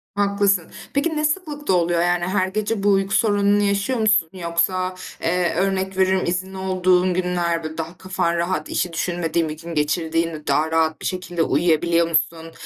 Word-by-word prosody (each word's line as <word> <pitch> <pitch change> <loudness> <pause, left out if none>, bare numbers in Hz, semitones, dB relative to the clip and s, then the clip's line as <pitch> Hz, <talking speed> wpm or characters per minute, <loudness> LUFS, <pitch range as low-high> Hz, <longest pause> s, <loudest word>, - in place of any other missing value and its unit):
Haklısın. 200 -3 +1 0.2
Peki 310 +3 0
ne 305 - +1
sıklıkta 300 - -1
oluyor? 170 -1 +2
Yani, 175 0 +1
her 185 0 +1
gece 210 +1 -2
bu 205 - +3
uyku 195 0 +1
sorununu 205 -2 +3
yaşıyor 200 +5 0
musun? 215 -6 +3
Yoksa, 185 +1 -1 0.3
eee, 175 0 +1
örnek 190 0 -1
veriyorum, 190 0 +2
izinli 185 +2 -3
olduğun 185 -1 +2
günler 175 -2 -1
böyle, 155 0 -6
daha 165 +1 -5
kafan 180 -2 -1
rahat, 170 -2 -2
işi 175 -2 -1
düşünmediğin 170 -1 -1
bir 155 - -6
gün 170 +1 -8
geçirdiğinde 160 +1 -1
daha 155 +1 +1
rahat 160 -1 +1
bir - - -6
şekilde 175 -2 -2
uyuyabiliyor 170 +2 +2
musun? 165 0 -1
180 Hz, 165 wpm, -21 LUFS, 170-195 Hz, 0.3 s, bu